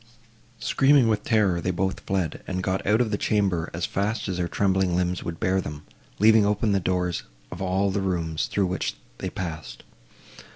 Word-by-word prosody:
Screaming 135 +3 +4
with 105 -1 0
terror, 100 -7 +2
they 90 - -1
both 95 +1 -1
fled, 95 -5 -2
and 95 0 -2
got 95 0 -1
out 110 +3 +4
of 115 -3 0
the 105 - -1
chamber 95 -6 +1
as 85 +1 -2
fast 105 +3 -2
as 95 -2 -2
their 90 -1 -1
trembling 95 -1 +1
limbs 90 0 0
would 85 -1 -5
bear 95 +1 +1
them, 75 -3 -7 0.3
leaving 110 +1 +6
open 105 +1 +1
the 100 - +3
doors 90 -1 -1 0.3
of 90 - -7
all 95 +1 +1
the 100 +1 -1
rooms, 85 -4 -1
through 100 - 0
which 90 0 -2 0.2
they - - -3
passed. 80 -9 -6
95 Hz, 190 wpm, -25 LUFS, 90-105 Hz, 0.3 s, leaving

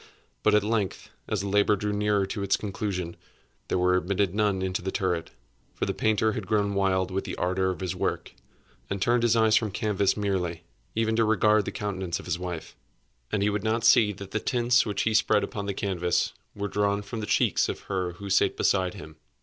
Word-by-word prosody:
But 105 0 +4
at 105 - +4
length, 105 -3 -2 0.2
as 105 -3 -1
the 100 - -3
labor 105 +1 +3
drew 105 +1 -2
nearer 105 -1 +1
to 95 +1 -5
its 100 0 +2
conclusion, 95 -4 -4 0.5
there - - 0
were 90 0 +3
admitted 95 +1 0
none 100 -3 +1
into 95 -1 -2
the 95 - -3
turret; 90 -3 -1 0.5
for - - -1
the - - -1
painter 110 0 +2
had 105 -3 -5
grown 100 -2 +1
wild 95 -1 +1
with 95 +1 -1
the - - -5
ardor 95 +1 0
of 95 - -4
his 90 -2 -2
work, - - -2 0.6
and 100 - -2
turned 120 +5 +2
his 120 -1 +3
eyes 110 -1 +4
from 110 -1 +2
canvas 100 -1 0
merely, 90 -5 -2 0.3
even 110 0 +1
to 115 - +4
regard 110 -1 +3
the - - -3
countenance 95 -4 -3
of - - -10
his 90 -1 -2
wife. 90 -3 -6 0.6
And 100 - +1
he 105 - +2
would 105 -1 -2
not 110 +1 0
see 110 -2 +6
that 100 0 -10
the 110 - 0
tints 120 +1 +2
which 100 -2 -1
he 110 - +1
spread 110 -1 +3
upon 100 -1 -4
the 100 - -1
canvas 90 -4 0 0.2
were 100 0 -3
drawn 100 0 0
from 110 +3 -6
the 105 - -4
cheeks - - +2
of - - -4
her 90 -3 -3
who 100 +3 -9
sate 95 - +3
beside 95 -2 +1
him. 80 0 -11
100 Hz, 215 wpm, -27 LUFS, 95-105 Hz, 0.6 s, see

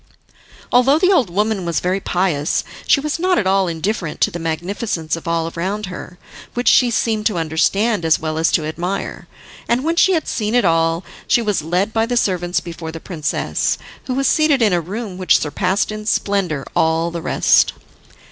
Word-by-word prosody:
Although 255 +4 +5
the 370 +3 +3
old 265 - +3
woman 210 +2 0
was 170 -3 -1
very 185 +2 0
pious, 175 -6 0 0.2
she - - +5
was 300 +3 -3
not 365 +1 +2
at 205 - +1
all 190 0 +2
indifferent 170 0 -3
to - - +3
the 175 - -5
magnificence 165 +1 -2
of 165 - -9
all 165 0 -1
around 195 +5 -2
her, 180 - -9 0.4
which 245 0 -2
she 250 - +5
seemed 220 -2 0
to 210 -6 -2
understand 170 +6 +1
as 160 -1 +3
well 155 0 -3
as 165 - +2
to 155 - +2
admire, 175 +5 -4 0.4
and 240 +2 +1
when 330 +2 0
she 380 +2 +5
had 325 - -1
seen 215 +1 -1
it 245 - +3
all 165 0 +2 0.2
she 235 - +3
was 210 -6 0
led 180 +7 -1
by 225 0 +1
the 245 0 0
servants 180 -4 0
before 165 -2 -7
the 165 - -7
princess, 155 -3 -2 0.3
who 255 - -1
was 275 0 +1
seated 310 -2 +3
in 210 -4 +3
a 175 - +2
room 195 +2 -6
which 185 -5 +4
surpassed 185 +7 -1
in 215 0 -6
splendour 190 -10 0
all 165 +1 +1
the 170 0 -5
rest. - - +3
190 Hz, 195 wpm, -19 LUFS, 165-225 Hz, 0.4 s, Although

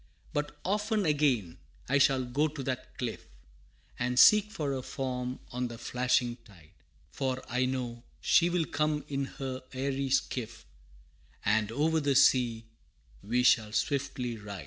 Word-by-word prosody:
But 150 0 -2
often 210 +2 0
again 130 - +1 0.3
I 135 +2 +3
shall 135 -2 +3
go 140 +5 +1
to 145 -2 -6
that 130 -1 -5
cliff, 120 -3 -4 0.7
And 125 0 -1
seek 210 +7 +7
for 150 -9 -2
her 135 -1 -2
form 125 -2 -4
on 125 0 -2
the 120 -1 -8
flashing 125 0 0
tide, 85 -9 -18 0.4
For 130 -1 -2
I 125 +1 0
know 125 -2 -3 0.2
she 175 0 +4
will 175 -2 +1
come 150 0 -1
in 140 -1 -2
her 130 -1 -4
airy 135 +1 -2
skiff, 125 -3 -2 0.8
And 110 0 +2
over 160 +6 +1
the 140 -2 +1
sea 120 -4 +4 0.6
we 120 +4 0
shall 110 -3 +4
swiftly 135 -3 -1
ride! 100 -2 -8
130 Hz, 145 wpm, -30 LUFS, 120-145 Hz, 0.8 s, seek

